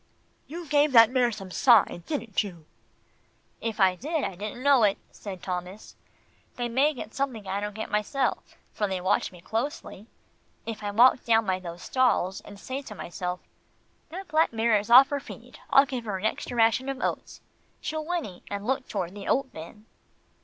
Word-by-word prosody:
"You 340 Hz, +3 st, -7 dB
gave 290 Hz, 0 st, +3 dB
that 230 Hz, -1 st, +8 dB
mare 250 Hz, -2 st, +2 dB
some 195 Hz, -3 st, -8 dB
sign, 225 Hz, -5 st, +4 dB
didn't 235 Hz, -10 st, -1 dB
you?" 175 Hz, -6 st, -10 dB, 1.0 s
"If 225 Hz, -1 st, -4 dB
I 190 Hz, -2 st, +5 dB
did, 305 Hz, -, -2 dB
I 195 Hz, -, -2 dB
didn't 210 Hz, +7 st, -7 dB
know 280 Hz, -3 st, +5 dB
it," 205 Hz, -2 st, +3 dB
said 190 Hz, -3 st, -9 dB
Thomas. 180 Hz, +2 st, -6 dB, 0.6 s
"They 245 Hz, -1 st, -2 dB
may 265 Hz, +6 st, +2 dB
get 225 Hz, -3 st, -8 dB
something 255 Hz, -7 st, -3 dB
I 195 Hz, +1 st, -2 dB
don't 205 Hz, 0 st, -4 dB
get 220 Hz, -, -6 dB
myself, 210 Hz, +6 st, -1 dB, 0.2 s
for 210 Hz, -, -1 dB
they 190 Hz, -1 st, -2 dB
watch 185 Hz, +1 st, 0 dB
me 180 Hz, -2 st, -14 dB
closely. 225 Hz, -, -4 dB, 0.6 s
If 225 Hz, -2 st, -5 dB
I 205 Hz, -, -3 dB
walk 240 Hz, +5 st, +5 dB
down 225 Hz, -1 st, +3 dB
by 185 Hz, -1 st, 0 dB
those 175 Hz, -1 st, -8 dB
stalls, 245 Hz, -7 st, +1 dB
and 200 Hz, -1 st, -13 dB
say 260 Hz, +5 st, -5 dB
to 230 Hz, -6 st, -10 dB
myself, 180 Hz, 0 st, -5 dB, 0.7 s
'That 375 Hz, +4 st, -8 dB
black 315 Hz, +2 st, +3 dB
mare 225 Hz, -1 st, +2 dB
is 205 Hz, -, -8 dB
off 255 Hz, +3 st, +9 dB
her 285 Hz, -1 st, -1 dB
feed, -, -, -12 dB
I'll 275 Hz, -, +6 dB
give 255 Hz, -3 st, -5 dB
her 205 Hz, -3 st, -2 dB
an 190 Hz, -, -5 dB
extra 240 Hz, +2 st, -2 dB
ration 230 Hz, +4 st, +3 dB
of 270 Hz, 0 st, -4 dB
oats,' -, -, -4 dB, 0.4 s
she'll 310 Hz, 0 st, -4 dB
whinny, 305 Hz, -, -4 dB
and 200 Hz, 0 st, -5 dB
look 265 Hz, +2 st, -1 dB
toward 185 Hz, -3 st, -3 dB
the 205 Hz, -1 st, -8 dB
oat 265 Hz, -1 st, 0 dB
bin." 170 Hz, +7 st, -11 dB
225 Hz, 190 wpm, -27 LUFS, 195-265 Hz, 1.0 s, off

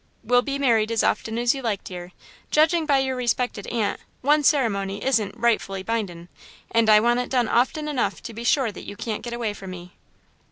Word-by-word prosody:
"We'll 245 Hz, 0 st, +4 dB
be 275 Hz, +1 st, -3 dB
married 230 Hz, -5 st, +2 dB
as 230 Hz, -, +1 dB
often 225 Hz, 0 st, 0 dB
as 240 Hz, 0 st, +2 dB
you 270 Hz, -, -6 dB
like, 215 Hz, -5 st, -2 dB
dear. 180 Hz, -1 st, -8 dB, 0.4 s
Judging 315 Hz, +1 st, +3 dB
by 280 Hz, -2 st, +4 dB
your 265 Hz, -1 st, 0 dB
respected 245 Hz, -4 st, -1 dB
aunt, 225 Hz, -4 st, -1 dB, 0.2 s
one 295 Hz, +3 st, +3 dB
ceremony 200 Hz, -9 st, +1 dB
isn't 225 Hz, -7 st, +1 dB
'rightfully 195 Hz, -5 st, 0 dB
bindin', 190 Hz, -6 st, -3 dB, 0.4 s
and 230 Hz, -1 st, +3 dB
I 210 Hz, 0 st, +8 dB
want 240 Hz, +2 st, +2 dB
it 250 Hz, -, -3 dB
done 245 Hz, -3 st, +1 dB
often 285 Hz, +6 st, +1 dB
enough 285 Hz, -5 st, -1 dB
to 230 Hz, -, -7 dB
be 230 Hz, +2 st, -7 dB
sure 240 Hz, -1 st, +2 dB
that -, -, -11 dB
you 205 Hz, -, -7 dB
can't 215 Hz, +1 st, -4 dB
get 240 Hz, -, -6 dB
away 230 Hz, -3 st, -2 dB
from 195 Hz, -2 st, -9 dB
me." 180 Hz, -1 st, -9 dB
235 Hz, 205 wpm, -24 LUFS, 205-260 Hz, 0.4 s, I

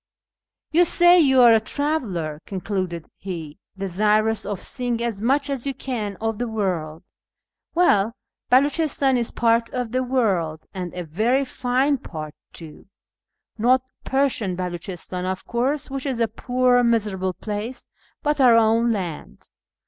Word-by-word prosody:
" -, -, -68 dB
You 335 Hz, +3 st, +5 dB
say 350 Hz, +1 st, +5 dB
you 265 Hz, -5 st, +5 dB
are 235 Hz, -2 st, +8 dB
a 225 Hz, -, +5 dB
traveller," 215 Hz, -, -2 dB
concluded 185 Hz, -4 st, -3 dB
he, 165 Hz, -4 st, -7 dB
" -, -, -41 dB
desirous 210 Hz, +4 st, +1 dB
of 205 Hz, -3 st, -3 dB
seeing 245 Hz, -2 st, -2 dB
as 225 Hz, -4 st, -3 dB
much 275 Hz, +5 st, +2 dB
as 275 Hz, -2 st, -3 dB
you 275 Hz, -, -2 dB
can 225 Hz, -6 st, -4 dB
of 225 Hz, -1 st, -2 dB
the 245 Hz, -, -1 dB
world: 180 Hz, -8 st, -3 dB, 0.7 s
well, 230 Hz, -, +3 dB, 0.3 s
Beluchistan 280 Hz, 0 st, +3 dB
is 235 Hz, -2 st, 0 dB
part 230 Hz, 0 st, +1 dB
of 250 Hz, -3 st, -3 dB
the 255 Hz, +1 st, 0 dB
world, 195 Hz, -12 st, 0 dB
and 180 Hz, -3 st, -5 dB
a 180 Hz, -, -4 dB
very 225 Hz, -, +1 dB
fine 260 Hz, +2 st, 0 dB
part 155 Hz, -6 st, -7 dB, 0.2 s
too; 160 Hz, 0 st, -11 dB, 0.7 s
not 250 Hz, +3 st, +3 dB, 0.2 s
Persian 265 Hz, -9 st, 0 dB
Beluchistan, 180 Hz, 0 st, -5 dB
of 185 Hz, 0 st, -3 dB
course, 265 Hz, +4 st, -1 dB
which 275 Hz, +1 st, -4 dB
is 255 Hz, -4 st, -2 dB
a 230 Hz, -, +2 dB
poor, 245 Hz, +2 st, +2 dB
miserable 205 Hz, -5 st, 0 dB
place, 215 Hz, +6 st, -5 dB, 0.4 s
but 295 Hz, -2 st, +1 dB
our 245 Hz, -3 st, +7 dB
own 230 Hz, +1 st, +3 dB
land." 180 Hz, -8 st, -5 dB
230 Hz, 150 wpm, -23 LUFS, 190-255 Hz, 0.7 s, are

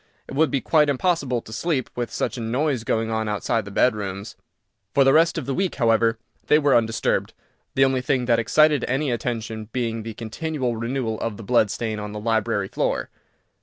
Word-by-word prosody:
It -, -, -8 dB
would 155 Hz, +3 st, +3 dB
be 135 Hz, -, 0 dB
quite 150 Hz, -2 st, +3 dB
impossible 140 Hz, -4 st, 0 dB
to 110 Hz, -, -10 dB
sleep, 140 Hz, +2 st, -1 dB
with 120 Hz, -1 st, -2 dB
such -, -, -2 dB
a 120 Hz, -, -5 dB
noise 125 Hz, +2 st, 0 dB
going 115 Hz, -1 st, -1 dB
on 110 Hz, -1 st, -1 dB
outside 105 Hz, +1 st, -1 dB
the -, -, -7 dB
bedrooms." 100 Hz, -2 st, -1 dB, 0.6 s
For 140 Hz, -, +6 dB
the 135 Hz, 0 st, +5 dB
rest 165 Hz, +1 st, +4 dB
of 155 Hz, -, -3 dB
the 135 Hz, -, -2 dB
week, 190 Hz, +5 st, -1 dB
however, 115 Hz, -2 st, +2 dB, 0.3 s
they 150 Hz, -, +6 dB
were 145 Hz, -3 st, +3 dB
undisturbed, 115 Hz, -1 st, 0 dB, 0.4 s
the 135 Hz, -, +5 dB
only 130 Hz, -1 st, +1 dB
thing 125 Hz, 0 st, 0 dB
that 120 Hz, -1 st, +3 dB
excited 150 Hz, +6 st, +3 dB
any 135 Hz, +2 st, 0 dB
attention 110 Hz, -2 st, -3 dB
being 115 Hz, -2 st, -2 dB
the 110 Hz, 0 st, -7 dB
continual 125 Hz, +2 st, -3 dB
renewal 115 Hz, -1 st, -2 dB
of 110 Hz, -3 st, -3 dB
the 115 Hz, -, -9 dB
blood 110 Hz, -1 st, +3 dB
stain 110 Hz, 0 st, -3 dB
on 105 Hz, 0 st, -6 dB
the 105 Hz, -, -5 dB
library 110 Hz, -2 st, 0 dB
floor. -, -, -2 dB
120 Hz, 200 wpm, -23 LUFS, 110-135 Hz, 0.6 s, For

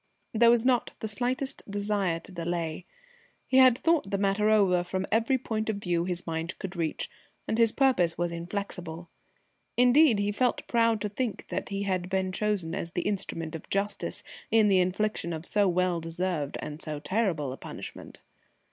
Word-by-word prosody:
There 230 Hz, +1 st, +5 dB
was 235 Hz, 0 st, +4 dB
not 250 Hz, -2 st, +2 dB
the 220 Hz, -, -3 dB
slightest 250 Hz, +5 st, -2 dB
desire 200 Hz, -4 st, 0 dB
to 195 Hz, -, -5 dB
delay. 170 Hz, -1 st, -3 dB, 0.6 s
He 260 Hz, -, +2 dB
had 255 Hz, -2 st, +7 dB
thought 325 Hz, -10 st, +2 dB
the 200 Hz, -, 0 dB
matter 200 Hz, +2 st, +2 dB
over 190 Hz, -5 st, +4 dB
from 185 Hz, +2 st, -3 dB
every 230 Hz, +4 st, +3 dB
point 220 Hz, -3 st, -3 dB
of 220 Hz, -, 0 dB
view 175 Hz, -4 st, -1 dB
his 180 Hz, -1 st, -3 dB
mind 165 Hz, +1 st, -3 dB
could 190 Hz, -1 st, -6 dB
reach, 165 Hz, -2 st, -2 dB, 0.4 s
and 220 Hz, -, -1 dB
his 230 Hz, -1 st, +5 dB
purpose 235 Hz, -13 st, +3 dB
was 175 Hz, 0 st, -1 dB
inflexible. 170 Hz, -1 st, -5 dB, 0.7 s
Indeed, 250 Hz, 0 st, +6 dB
he 205 Hz, 0 st, 0 dB
felt 250 Hz, +4 st, 0 dB
proud 230 Hz, -2 st, +2 dB
to 210 Hz, -, -1 dB
think 225 Hz, +1 st, -4 dB
that -, -, -3 dB
he 200 Hz, 0 st, -2 dB
had 185 Hz, -2 st, -1 dB
been 190 Hz, -1 st, 0 dB
chosen 195 Hz, -4 st, -1 dB
as 170 Hz, -2 st, -4 dB
the 175 Hz, -, -1 dB
instrument 165 Hz, -5 st, -3 dB
of 160 Hz, -, -8 dB
justice 200 Hz, +1 st, -1 dB, 0.3 s
in 220 Hz, -2 st, +4 dB
the 190 Hz, -2 st, +5 dB
infliction 185 Hz, -1 st, 0 dB
of 160 Hz, +1 st, -5 dB
so 205 Hz, 0 st, +3 dB
well 180 Hz, -1 st, +1 dB
deserved 165 Hz, -3 st, -2 dB
and 150 Hz, +2 st, -7 dB
so 155 Hz, -2 st, -4 dB
terrible 165 Hz, -, -1 dB
a -, -, -9 dB
punishment. -, -, -9 dB
195 Hz, 180 wpm, -28 LUFS, 170-220 Hz, 0.7 s, had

